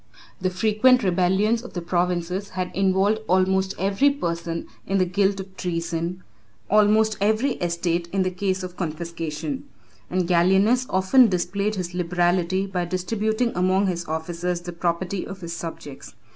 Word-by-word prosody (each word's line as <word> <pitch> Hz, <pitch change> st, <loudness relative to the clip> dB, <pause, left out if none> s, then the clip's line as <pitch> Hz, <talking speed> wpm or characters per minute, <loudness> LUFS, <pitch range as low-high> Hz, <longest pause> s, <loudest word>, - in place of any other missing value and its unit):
The 185 Hz, -1 st, 0 dB
frequent 215 Hz, +6 st, +3 dB
rebellions 190 Hz, +5 st, +2 dB
of 245 Hz, -, -11 dB
the 175 Hz, -, -3 dB
provinces 180 Hz, +2 st, -1 dB
had 185 Hz, -1 st, -4 dB
involved 195 Hz, +2 st, +2 dB
almost 190 Hz, +1 st, +2 dB
every 195 Hz, +9 st, +3 dB
person 170 Hz, -10 st, -3 dB, 0.2 s
in 195 Hz, -, +1 dB
the 185 Hz, -, +3 dB
guilt 195 Hz, +2 st, +1 dB
of 190 Hz, 0 st, -8 dB
treason, 170 Hz, 0 st, -3 dB, 0.5 s
almost 215 Hz, +1 st, +4 dB
every 220 Hz, +7 st, +2 dB
estate 170 Hz, 0 st, -1 dB
in 195 Hz, -1 st, +1 dB
the 185 Hz, -, -1 dB
case 185 Hz, 0 st, -2 dB
of 180 Hz, -1 st, -7 dB
confiscation; 170 Hz, -, -4 dB, 0.4 s
and 180 Hz, -1 st, 0 dB
Gallienus 190 Hz, +8 st, +3 dB
often 190 Hz, +7 st, +5 dB
displayed 200 Hz, +3 st, -1 dB
his 180 Hz, -2 st, -4 dB
liberality 180 Hz, +1 st, +1 dB
by 185 Hz, -2 st, -2 dB
distributing 220 Hz, +6 st, -1 dB
among 185 Hz, +2 st, +2 dB
his 175 Hz, -2 st, -1 dB
officers 170 Hz, +2 st, -3 dB
the 175 Hz, 0 st, -7 dB
property 175 Hz, +2 st, -2 dB
of 195 Hz, -1 st, -8 dB
his 170 Hz, -1 st, -5 dB
subjects. 160 Hz, -5 st, -8 dB
185 Hz, 145 wpm, -24 LUFS, 175-200 Hz, 0.5 s, often